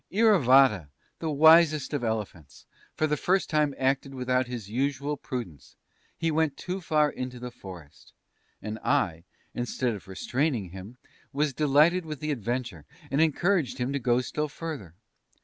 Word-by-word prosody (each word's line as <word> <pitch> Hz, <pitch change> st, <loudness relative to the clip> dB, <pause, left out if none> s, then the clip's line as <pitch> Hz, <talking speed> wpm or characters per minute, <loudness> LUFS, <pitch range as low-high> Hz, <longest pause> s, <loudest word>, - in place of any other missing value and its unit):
Iravata, 135 Hz, -, +4 dB, 0.3 s
the 160 Hz, -, -3 dB
wisest 155 Hz, 0 st, +5 dB
of 140 Hz, -4 st, -2 dB
elephants, 105 Hz, -8 st, -5 dB, 0.3 s
for 155 Hz, -, +1 dB
the 150 Hz, -1 st, +1 dB
first 185 Hz, +4 st, 0 dB
time 150 Hz, -3 st, +1 dB
acted 135 Hz, +1 st, 0 dB
without 125 Hz, 0 st, 0 dB
his 120 Hz, -5 st, -6 dB
usual 140 Hz, +5 st, -1 dB
prudence; 120 Hz, -, -7 dB, 0.4 s
he 165 Hz, -1 st, 0 dB
went 155 Hz, -2 st, 0 dB
too 185 Hz, +1 st, -5 dB
far 150 Hz, -3 st, +2 dB
into 125 Hz, -1 st, -6 dB
the 125 Hz, 0 st, -7 dB
forest, 90 Hz, -9 st, -13 dB, 0.5 s
and 110 Hz, +1 st, -5 dB
I, 85 Hz, -2 st, 0 dB, 0.3 s
instead 120 Hz, 0 st, -2 dB
of 100 Hz, -, -9 dB
restraining 115 Hz, -, -2 dB
him, 95 Hz, +6 st, -10 dB, 0.3 s
was 145 Hz, 0 st, 0 dB
delighted 155 Hz, +6 st, +3 dB
with 155 Hz, -3 st, -7 dB
the 155 Hz, 0 st, -2 dB
adventure, 120 Hz, -, -3 dB, 0.3 s
and 140 Hz, +3 st, +2 dB
encouraged 160 Hz, -2 st, +1 dB
Him 125 Hz, +2 st, -2 dB
to 140 Hz, -, -1 dB
go 120 Hz, 0 st, +2 dB
still 150 Hz, +4 st, -3 dB
further. 145 Hz, -, -7 dB
135 Hz, 150 wpm, -27 LUFS, 120-155 Hz, 0.5 s, wisest